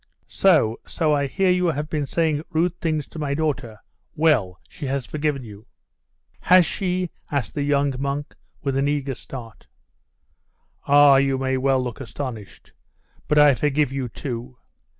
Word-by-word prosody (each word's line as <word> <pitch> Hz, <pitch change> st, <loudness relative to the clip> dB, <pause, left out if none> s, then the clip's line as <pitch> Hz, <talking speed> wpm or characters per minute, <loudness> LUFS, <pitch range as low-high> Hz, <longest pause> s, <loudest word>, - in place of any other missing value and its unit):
'So, 150 Hz, -, +3 dB
so 155 Hz, -2 st, 0 dB
I 140 Hz, -1 st, +1 dB
hear 185 Hz, +7 st, +1 dB
you 180 Hz, 0 st, +2 dB
have 150 Hz, -2 st, -1 dB
been 150 Hz, -3 st, -2 dB
saying 160 Hz, -2 st, 0 dB
rude 165 Hz, +3 st, +1 dB
things 155 Hz, -4 st, -1 dB
to 160 Hz, -, -9 dB
my 140 Hz, -2 st, -1 dB
daughter. 135 Hz, -8 st, -2 dB, 0.4 s
Well, 130 Hz, -, +2 dB
she 145 Hz, -, -7 dB
has 135 Hz, -1 st, -2 dB
forgiven 150 Hz, -3 st, -2 dB
you 105 Hz, 0 st, -12 dB, 0.3 s
' -, -, -44 dB
'Has 180 Hz, -1 st, +7 dB
she?' 180 Hz, -1 st, -2 dB, 0.2 s
asked 140 Hz, -3 st, -2 dB
the 145 Hz, -, -2 dB
young 140 Hz, -1 st, +1 dB
monk, 140 Hz, +1 st, -3 dB, 0.3 s
with 135 Hz, -2 st, -1 dB
an 140 Hz, +1 st, +1 dB
eager 140 Hz, -2 st, -1 dB
start. 115 Hz, -3 st, -10 dB, 1.2 s
'Ah! 145 Hz, -1 st, +7 dB
you 135 Hz, 0 st, +2 dB
may 130 Hz, 0 st, -1 dB
well 130 Hz, 0 st, +1 dB
look 125 Hz, 0 st, -6 dB
astonished. 120 Hz, -5 st, -8 dB, 0.5 s
But 150 Hz, -, +1 dB
I 150 Hz, -1 st, +7 dB
forgive 145 Hz, +1 st, +1 dB
you 135 Hz, -2 st, -3 dB
too. 125 Hz, +1 st, -6 dB
140 Hz, 160 wpm, -23 LUFS, 130-155 Hz, 1.2 s, Has